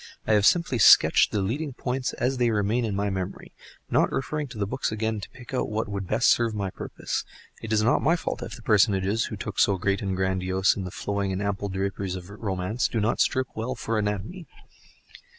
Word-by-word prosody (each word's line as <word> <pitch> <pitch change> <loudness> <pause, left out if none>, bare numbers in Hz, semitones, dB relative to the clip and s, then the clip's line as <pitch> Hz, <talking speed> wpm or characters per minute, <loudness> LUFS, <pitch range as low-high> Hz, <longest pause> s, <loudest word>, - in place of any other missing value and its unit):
I 110 - +2
have 105 -1 +5
simply 170 -8 +2
sketched - - +7
the 105 -2 0
leading 140 +8 -2
points 130 +1 -3
as 130 +2 -1
they 120 -1 +3
remain 110 +2 +1
in 105 -3 -2
my 100 0 -1
memory, 95 0 -5 0.4
not - - +3
referring 150 +2 -2
to 115 - -10
the 100 - 0
books 130 +5 -2
again 110 0 -2
to - - -8
pick 125 0 -13
out 130 - -1
what 110 +1 -2
would 100 -2 -4
best 110 +6 +3
serve 115 -2 +1
my 100 -2 -2
purpose. - - -4 0.4
It 110 - -6
is 110 -1 +3
not 120 - +3
my 160 +4 +3
fault 170 - -4
if 120 - -6
the 120 - -14
personages, 100 +1 +2
who - - -5
looked - - -4
so 100 - +3
great 100 +2 0
and 95 -2 -2
grandiose 95 0 +1
in 95 - -4
the - - -4
flowing 100 +1 -2
and 95 - -2
ample 100 0 -2
draperies 95 0 -3
of 90 +1 -9
romance, 100 +1 -2
do 115 - -2
not 110 +2 0
strip 130 -1 +1
well 115 +4 -3
for 115 -1 -2
anatomy. 105 - -3
105 Hz, 220 wpm, -26 LUFS, 95-120 Hz, 0.4 s, sketched